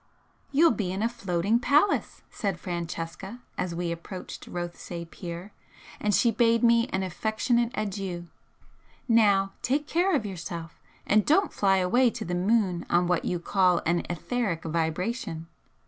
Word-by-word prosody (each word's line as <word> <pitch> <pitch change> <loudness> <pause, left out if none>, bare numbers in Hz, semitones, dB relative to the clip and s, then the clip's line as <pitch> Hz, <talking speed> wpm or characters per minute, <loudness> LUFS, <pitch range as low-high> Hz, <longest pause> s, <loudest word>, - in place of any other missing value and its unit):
"You'll 325 +4 +5
be 200 -5 -2
in 195 +3 -2
a - - +3
floating 210 -2 0
palace," 295 +10 +2
said 195 -4 -2
Francesca, 175 +4 -5 0.2
as 175 -2 -3
we 170 0 -2
approached 170 +3 -7
Rothesay 175 -1 -5
pier, 170 +3 -8 0.5
and 210 - +1
she 235 - +4
bade 230 +1 +3
me 235 0 +5
an 190 -6 -2
affectionate 225 +6 0
adieu 195 -4 -3 0.8
"Now 205 -4 +4
take 285 +4 0
care 350 +4 +2
of 225 - 0
yourself, 170 -4 -6 0.3
and 210 +1 +4
don't 385 - +3
fly 195 -1 +3
away 240 +8 +3
to 225 -1 -6
the 180 - -3
moon 185 -1 +1
on 175 +1 +3
what 175 -1 0
you 180 - 0
call 180 0 +2
an 170 +1 +1
etheric 175 +1 -2
vibration! 165 +2 -2
195 Hz, 145 wpm, -27 LUFS, 175-230 Hz, 0.8 s, You'll